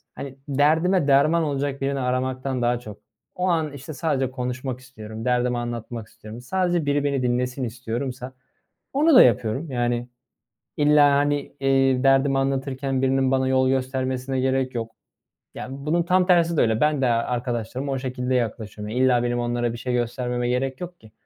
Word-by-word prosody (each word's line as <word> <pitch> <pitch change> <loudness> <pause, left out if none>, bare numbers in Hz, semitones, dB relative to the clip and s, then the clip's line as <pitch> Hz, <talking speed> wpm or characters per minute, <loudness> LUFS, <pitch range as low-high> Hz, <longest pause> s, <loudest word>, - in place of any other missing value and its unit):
hani, 135 -1 -7
derdime 160 +4 +2
derman 150 +4 +4
olacak 140 -2 -2
birini 140 0 -1
aramaktan 130 0 -2
daha 120 0 +1
çok, 105 -4 -10 0.4
o 180 - -1
an, 160 -4 0
işte, 145 +3 -8
sadece 135 -4 -1
konuşmak 125 0 -4
istiyorum, 110 -3 -9
derdimi 125 0 +1
anlatmak 120 -1 -5
istiyorum, 110 +2 -11
sadece 175 +3 0
biri 145 0 +1
beni 140 -2 0
dinlesin 125 +1 -1
istiyorsam 125 +2 -5 0.6
onu 300 +2 +4
da 255 - +10
yapıyorum. 120 +6 +1
Yani, 120 -1 -1 0.7
illa, 145 -1 +5
hani, 145 0 0
eee, 135 -1 +2
derdimi 135 0 +3
anlatırken 135 0 -1
birinin 135 0 +2
bana 130 0 +1
yol 130 0 +3
göstermesine 130 0 -1
gerek 130 0 0
yok. 115 -1 -4 0.6
Yani, 130 +1 -7
bunun 170 +3 +2
tam 180 +1 +2
tersi 170 -2 +3
de - - +3
öyle. 110 0 +2
Ben 150 -2 +2
de - - +3
arkadaşlarıma 120 +2 -2
o 135 - -1
şekilde 125 0 -3
yaklaşıyorum. 110 -3 -3
Ya, 130 +1 +2
illa 125 -2 +3
benim 120 0 -1
onlara 120 0 -1
bir 115 - -7
şey 125 +2 -3
göstermeme 120 0 -1
gerek 130 +1 -1
yok 175 0 -8
ki. 110 -1 -17
130 Hz, 165 wpm, -23 LUFS, 120-140 Hz, 0.7 s, da